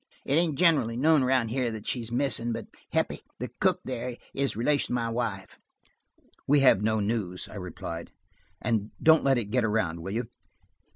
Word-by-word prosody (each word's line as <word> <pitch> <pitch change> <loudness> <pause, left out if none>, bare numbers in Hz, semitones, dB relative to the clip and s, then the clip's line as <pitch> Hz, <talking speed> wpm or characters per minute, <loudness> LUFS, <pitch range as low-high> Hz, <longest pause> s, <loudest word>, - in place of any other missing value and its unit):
"It - - -1
ain't 160 -2 +2
generally 150 -10 +3
known 155 +2 +4
around 130 -3 +2
here 125 +1 0
that 110 -1 -7
she's 115 -2 -2
missing, 120 -2 +1
but 115 - -5 0.3
Heppie, - - 0 0.2
the - - -5
cook - - +2
there, 125 -1 -4 0.2
is 140 -4 -1
a - - -9
relation 140 +3 +1
of - - +2
my 115 -1 -1
wife's." 115 -5 -3 0.9
"We 145 0 +5
have 130 -7 +5
no 110 +1 +1
news," 100 -4 -2
I - - -9
replied, 85 -2 -6 0.5
"and 110 -3 -1
don't 160 0 +5
let 135 -2 +3
it 105 -4 -3
get 125 0 +2
around, 105 -7 0
will 90 - -5
you?" 120 +2 -1
120 Hz, 185 wpm, -27 LUFS, 110-135 Hz, 0.9 s, We